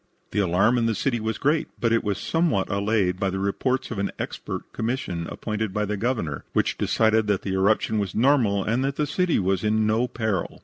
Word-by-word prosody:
The - - 0
alarm 100 +6 +3
in 115 - +1
the 115 - 0
city 120 0 0
was 110 +1 -2
great, 150 +2 +1
but 115 -1 +2
it 115 - +2
was 100 -2 -1
somewhat 165 - 0
allayed 100 -2 +1
by 95 - +1
the 95 - -3
report 125 +7 -1
of 110 - -3
an 100 - 0
expert - - -6
commission 110 -8 -2
appointed 110 -2 -3
by 105 0 +1
the 105 +1 -2
Governor, 105 - -2
which - - +1
decided 110 -1 +2
that 100 -1 0
the 95 - -2
eruption 105 +3 +2
was 100 -4 -3
normal 115 -5 +3
and 120 +4 0
that 135 0 -1
the 150 - 0
city 180 +4 +1
was 95 0 0
in 110 0 +2
no 110 +3 +2
peril. 110 -7 -2
110 Hz, 215 wpm, -24 LUFS, 100-120 Hz, -, alarm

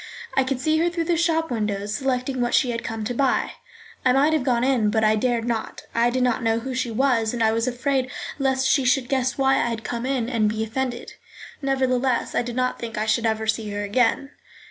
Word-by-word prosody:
I 270 - +3
could 260 0 -2
see 310 +4 +1
her 340 +1 +2
through 340 -1 -2
the 340 +1 +1
shop 325 -2 +1
windows 210 -2 -2
selecting 255 +1 -1
what 240 0 +1
she 250 - +3
had 230 0 -4
come 225 -1 -4
to 220 - -2
buy. 265 +1 +1 0.5
I 255 - +4
might 285 +4 +3
have 310 -4 +1
gone 245 -2 +1
in, 250 -5 +2
but 220 +1 +1
I 215 0 +4
dared 235 +1 0
not. 230 -2 -3
I 235 +1 +3
did 255 +1 0
not 250 0 +1
know 225 -1 +1
who 255 +3 -4
she 250 -1 -1
was, 230 -2 +1
and 230 - 0
I 220 - +4
was 230 +2 0
afraid 260 +1 0 0.3
lest 265 -1 +1
she 270 0 +3
should 255 0 +2
guess 260 -1 0
why 270 -1 +3
I - - +1
had 225 -1 -4
come 240 +1 -3
in 260 -4 -1
and 225 -4 +1
be 220 +1 -2
offended. 240 +2 -3 0.5
Nevertheless, 260 -2 0
I - - +2
did 240 0 -5
not 255 0 -1
think 230 -2 -6
I 215 - 0
should 225 +1 +1
ever 220 0 -1
see 215 0 -1
her 205 0 -3
again. 245 +6 +1
245 Hz, 235 wpm, -23 LUFS, 225-265 Hz, 0.5 s, I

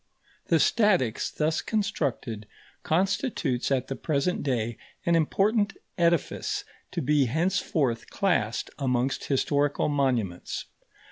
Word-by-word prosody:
The 165 - +4
statics 185 - +2
thus 155 +1 0
constructed 140 - -2 0.3
constitutes 175 - 0
at 130 -1 +1
the 135 - -3
present 155 +5 0
day 120 -5 -1 0.3
an 170 - +3
important 205 +6 +2 0.2
edifice 170 -3 0 0.3
to - - -2
be 145 0 +3
henceforth 155 - 0
classed 175 - 0
amongst 130 -1 0
historical 145 +1 +1
monuments. 125 -11 -1
145 Hz, 105 wpm, -27 LUFS, 125-180 Hz, 0.3 s, The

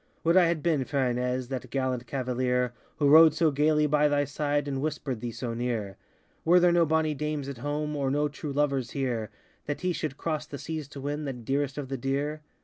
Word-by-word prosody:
Would 170 +1 +3
I 185 -2 +7
had 165 -3 -1
been, 155 -6 +2
fair 130 -2 0
Ines, 125 +1 -2
That 130 -2 -5
gallant 130 -3 -2
cavalier, 125 -1 0 0.2
Who 145 - +2
rode 155 +1 +8
so 160 -1 +3
gaily 150 +2 +3
by 150 0 +3
thy 145 -1 +2
side, 145 +1 -1
And 135 -1 -2
whisperŌĆÖd 145 -4 -3
thee 120 +1 -4
so 115 +1 -4
near! 115 -5 -2 0.5
Were 175 +2 +6
there 175 0 +5
no 170 -1 +4
bonny 160 0 +2
dames 150 -1 -3
at 140 -4 -6
home 150 +2 -2
Or 140 -2 0
no 145 +2 +1
true 145 0 -6
lovers 140 -3 0
here, 120 -6 -2 0.4
That 145 - -3
he 180 -1 0
should 155 -4 -4
cross 155 -2 -3
the 145 - -7
seas 155 -1 -5
to 140 -1 -9
win 145 +2 -3
The 135 - -2
dearest 135 +4 -2
of 145 -2 -4
the 135 - -2
dear? 140 +4 -2
145 Hz, 220 wpm, -28 LUFS, 130-150 Hz, 0.5 s, rode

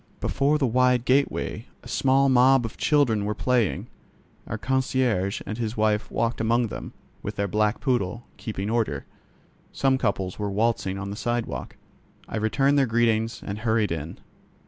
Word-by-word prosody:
Before 140 +2 +1
the 145 - +1
wide 125 0 +3
gateway 140 +2 0 0.2
a - - -11
small 135 +1 +3
mob 130 -1 +5
of 115 - -6
children 130 -9 +2
were 105 +1 -2
playing. 125 -5 +1 0.6
Our - - -3
concierge 130 -7 0
and 110 +2 -5
his 115 -1 -3
wife 105 -1 +1
walked 115 0 -1
among 115 +1 +2
them, - - -7 0.3
with - - -5
their 100 - -1
black 105 +2 +1
poodle, 120 -4 -1
keeping 100 -3 -4
order; 110 -12 -1 0.7
some 135 -1 +1
couples 95 -5 -1
were 105 -1 -1
waltzing 100 -2 0
on 100 +1 -5
the - - -5
sidewalk. 120 +2 -3 0.5
I - - -4
returned 135 +6 +2
their 135 - +3
greetings 115 0 +1
and 100 +1 -4
hurried 110 -3 +1
in. 80 0 -4
115 Hz, 160 wpm, -25 LUFS, 105-130 Hz, 0.7 s, mob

